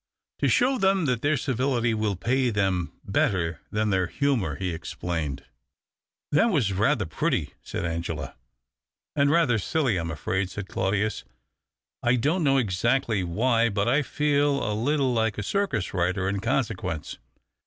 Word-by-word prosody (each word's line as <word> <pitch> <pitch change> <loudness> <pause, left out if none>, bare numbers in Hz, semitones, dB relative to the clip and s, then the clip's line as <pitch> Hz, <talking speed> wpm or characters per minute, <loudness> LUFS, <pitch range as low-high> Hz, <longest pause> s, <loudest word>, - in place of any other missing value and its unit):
"To - - +2
show 255 +2 +3
them 190 -3 +3
that 125 -4 0
their 145 +1 +2
civility 125 -2 0
will 105 -2 0
pay 125 +7 +1
^hem 95 -4 0
better 85 -5 0
than 105 0 0
their 95 -2 +1
humour," 120 - 0
he 90 +4 -3
explained. 80 -4 -4 0.4
" - - -66
That 150 +11 +4
was 130 - +1
rather 110 +3 +2
pretty," 80 - -1
said - - -4
Angela, 80 -3 -3 0.4
" - - -66
And 140 -1 +3
rather 145 -8 +3
silly, 130 - 0
I'm 85 -1 -3
afraid," 90 +4 -2
said 100 0 -6
Claudius. 100 +3 -1 0.4
' - - -62 0.3
I 120 +1 +3
don't 150 +9 +1
know 135 -2 +4
exactly 110 -1 +1
why, 115 +6 +2
but 100 0 0
I 135 +5 +3
feel 145 0 +1
a 105 - 0
little 130 +2 +1
ike 110 -2 0
a 105 - -2
circus 135 - -1
rider 95 +1 0
in 100 +1 -1
consequence. 110 - -2
110 Hz, 160 wpm, -26 LUFS, 95-135 Hz, 0.4 s, That